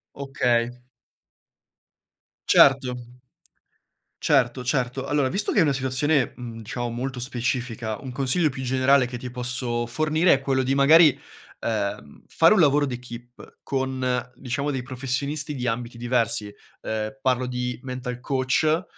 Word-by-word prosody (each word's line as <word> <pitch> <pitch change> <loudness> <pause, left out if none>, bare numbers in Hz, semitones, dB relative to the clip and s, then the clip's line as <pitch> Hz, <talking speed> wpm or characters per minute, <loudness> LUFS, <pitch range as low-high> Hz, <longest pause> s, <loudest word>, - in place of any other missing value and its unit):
Okay. 125 -4 0 1.8
Certo. 135 -2 +5 1.3
Certo, 125 -3 +2
certo. 130 0 -1
Allora, 145 -2 +1
visto 205 +6 -1
che - - +3
è - - +6
una 150 -3 +2
situazione, 135 +1 0
mhmm, 120 -2 -8
diciamo, 120 +2 -4
molto 125 +2 -4
specifica, 120 -2 -3
un 130 -2 -7
consiglio 140 +5 +1
più 130 0 -7
generale 130 +1 +3
che 125 0 -6
ti 125 +1 -7
posso 125 -1 -2
fornire 155 +7 +2
è 135 - -1
quello 135 -1 +1
di, 130 +1 0
magari, 150 +2 +6 0.4
ehm, 100 -10 -4
fare 165 - +5
un 215 - +4
lavoro 145 -2 +4
d'equipe 120 -2 -9
con, 130 -2 -2
diciamo, 140 +3 -3
dei 135 -3 -3
professionisti 140 +3 -3
di 125 -2 -4
ambiti 120 0 -3
diversi. 115 -4 -1 0.3
Ehm, 110 +2 -3
parlo 130 -1 +1
di 125 0 -4
mental 125 -2 -5
coach, 140 +6 +1
130 Hz, 135 wpm, -24 LUFS, 120-140 Hz, 1.8 s, è